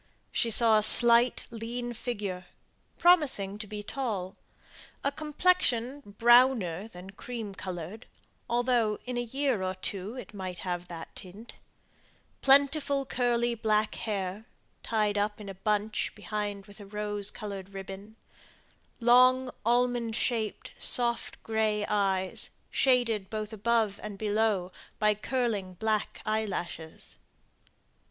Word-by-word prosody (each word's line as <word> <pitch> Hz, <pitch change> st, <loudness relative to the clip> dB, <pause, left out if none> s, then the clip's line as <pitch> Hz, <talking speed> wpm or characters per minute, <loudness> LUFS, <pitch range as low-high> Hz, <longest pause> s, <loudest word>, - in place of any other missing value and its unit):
She 235 Hz, -, +1 dB
saw 225 Hz, -1 st, +5 dB
a -, -, -1 dB
slight, 235 Hz, +2 st, +6 dB
lean 240 Hz, +1 st, -4 dB
figure, 205 Hz, -7 st, -4 dB, 0.5 s
promising 265 Hz, -, +3 dB
to 210 Hz, -, -6 dB
be 210 Hz, 0 st, -6 dB
tall; 205 Hz, -7 st, -3 dB, 0.7 s
a 280 Hz, -, +1 dB
complexion 290 Hz, -4 st, +1 dB, 0.2 s
browner 235 Hz, -6 st, +4 dB
than 185 Hz, -2 st, -11 dB
cream 220 Hz, 0 st, -6 dB
coloured, 185 Hz, +3 st, -7 dB, 0.4 s
although 240 Hz, -3 st, +2 dB
in 250 Hz, 0 st, -4 dB
a 240 Hz, -, 0 dB
year 260 Hz, -2 st, -1 dB
or 185 Hz, 0 st, -2 dB
two 195 Hz, +4 st, -5 dB
it 250 Hz, -, -9 dB
might 185 Hz, -3 st, -5 dB
have 175 Hz, -1 st, -3 dB
that 165 Hz, -2 st, -9 dB
tint; 205 Hz, +4 st, -8 dB, 0.9 s
plentiful 280 Hz, 0 st, +4 dB
curly 240 Hz, -1 st, +1 dB
black 215 Hz, -1 st, +1 dB
hair, 200 Hz, -1 st, -3 dB, 0.4 s
tied 210 Hz, -2 st, 0 dB
up 210 Hz, +1 st, -1 dB
in 205 Hz, -2 st, -8 dB
a -, -, -5 dB
bunch 210 Hz, +2 st, -1 dB
behind 205 Hz, -1 st, -4 dB
with 205 Hz, +1 st, -14 dB
a 200 Hz, -, -10 dB
rose 205 Hz, 0 st, -2 dB
coloured 200 Hz, -2 st, -7 dB
ribbon; 195 Hz, +2 st, -8 dB, 0.8 s
long, 255 Hz, +2 st, +5 dB
almond 240 Hz, -1 st, +1 dB
shaped, 225 Hz, -4 st, -2 dB
soft 235 Hz, -1 st, +1 dB
gray 215 Hz, -2 st, 0 dB
eyes, 195 Hz, -2 st, 0 dB, 0.2 s
shaded 235 Hz, -7 st, +2 dB
both 215 Hz, 0 st, -4 dB
above 220 Hz, -1 st, +1 dB
and 210 Hz, -2 st, -7 dB
below 210 Hz, -3 st, 0 dB, 0.3 s
by 210 Hz, 0 st, +3 dB
curling 210 Hz, -4 st, -2 dB
black 215 Hz, +2 st, -2 dB
eyelashes. 195 Hz, -7 st, -4 dB
215 Hz, 120 wpm, -29 LUFS, 200-240 Hz, 0.9 s, slight